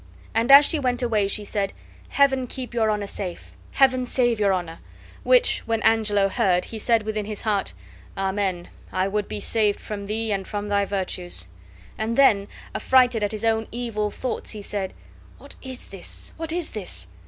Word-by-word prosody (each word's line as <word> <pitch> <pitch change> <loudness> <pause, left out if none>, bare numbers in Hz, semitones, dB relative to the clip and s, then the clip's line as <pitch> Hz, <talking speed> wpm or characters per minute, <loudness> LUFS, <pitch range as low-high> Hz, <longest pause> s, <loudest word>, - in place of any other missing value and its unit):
And 230 +4 +2
as 280 +1 +10
she 315 - 0
went 250 -2 0
away 215 -4 +2
she 210 +1 -2
said: 200 -1 -2 0.4
"Heaven 265 -2 +2
keep 250 -1 -6
your 225 -2 +2
Honor 210 -1 0
safe! 190 -3 -5 0.2
Heaven 260 -2 +4
save 240 -3 +2
your 200 -2 +3
Honor!" 175 -3 -3 0.4
Which, - - +4
when 225 -1 +1
Angelo 210 -3 +3
heard, 190 -4 +1
he 225 - -7
said 230 0 +2
within 215 -1 -3
his 210 -1 -5
heart, 205 - 0 0.4
"Amen, 190 -2 -1 0.2
I 185 +1 0
would 205 +1 -1
be - - -5
saved 210 0 +2
from 200 -2 -6
thee 220 +1 -2
and 195 -2 -2
from 205 -1 -4
thy 200 0 +2
virtues." 185 - -3 0.5
And 225 +2 -1
then, 205 -8 +5 0.3
affrighted 250 -4 +3
at 205 - 0
his 215 +1 -3
own 225 -1 +1
evil 225 -3 -2
thoughts, 255 +4 -4
he 215 - -2
said: 195 -2 -3 0.4
"What - - -11
is 260 -2 -8
this? 195 -2 -7
What 325 -1 -4
is 345 -1 -3
this? 180 - -5
215 Hz, 180 wpm, -24 LUFS, 200-240 Hz, 0.5 s, as